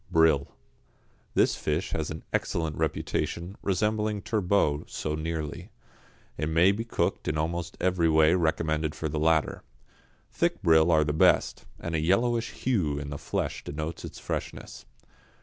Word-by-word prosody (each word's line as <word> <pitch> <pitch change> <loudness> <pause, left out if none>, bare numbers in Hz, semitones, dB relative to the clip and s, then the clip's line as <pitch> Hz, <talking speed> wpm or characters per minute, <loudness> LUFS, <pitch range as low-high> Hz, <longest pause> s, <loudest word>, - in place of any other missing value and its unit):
=Brill.= 80 -4 +4 0.9
This - - +3
fish 75 +5 -2
has 80 -1 -2
an 80 +1 -6
excellent 80 -3 -1
reputation, 85 +6 -2
resembling 105 +1 0
turbot 95 -8 +1
so 75 - -3
nearly; 80 -1 -4 0.7
it 75 +1 -1
may 85 +4 +5
be 105 +3 -2
cooked 115 - -1
in 75 - 0
almost 85 +2 -2
every 90 -2 +2
way 80 +1 +5
recommended 80 -3 0
for 80 - -3
the 75 0 -2
latter. 80 0 +2 0.7
Thick - - 0
brill 80 +1 +5
are 80 -1 +5
the 75 0 -1
best, 80 - +3
and 85 - -5
a 80 - +1
yellowish 115 +8 +1
hue 90 - -1
in 70 0 -5
the 70 - -5
flesh - - -3
denotes 75 +3 -5
its - - -8
freshness. - - -6
80 Hz, 150 wpm, -27 LUFS, 75-90 Hz, 0.9 s, may